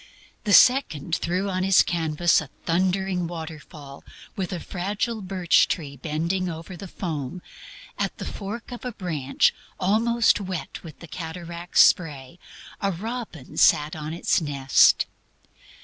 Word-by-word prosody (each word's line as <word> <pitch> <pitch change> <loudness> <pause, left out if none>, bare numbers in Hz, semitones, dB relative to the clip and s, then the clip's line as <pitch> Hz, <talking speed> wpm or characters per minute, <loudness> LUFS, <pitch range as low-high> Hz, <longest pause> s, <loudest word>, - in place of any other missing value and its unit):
The 205 - +2
second 175 - +4
threw 180 +3 -1
on 185 -1 -1
his 190 0 +5
canvas 165 0 +1
a 150 - -9 0.2
thundering 185 +1 0
waterfall, 155 -4 -9 0.3
with 185 -3 -3
a 180 - -3
fragile 205 +6 -3
birch 185 -2 +3
tree 145 -5 -4
bending 170 +6 -2
over 165 +2 -7
the 195 +3 -8
foam; 165 -3 -5 0.6
at - - -2
the - - -6
fork 210 +4 -6
of 245 - -8
a 250 -1 -4
branch, 155 - 0 0.3
almost 225 +4 +3
wet 185 -3 -5
with 160 -4 -12
the 170 - -9
cataract's 170 +1 -1
spray, 150 -2 +2 0.4
a 200 -1 +1
robin 205 - -6
sat 150 +1 +4
on 155 0 -5
its 170 +1 +1
nest. 140 -3 +4
175 Hz, 135 wpm, -24 LUFS, 155-195 Hz, 0.6 s, his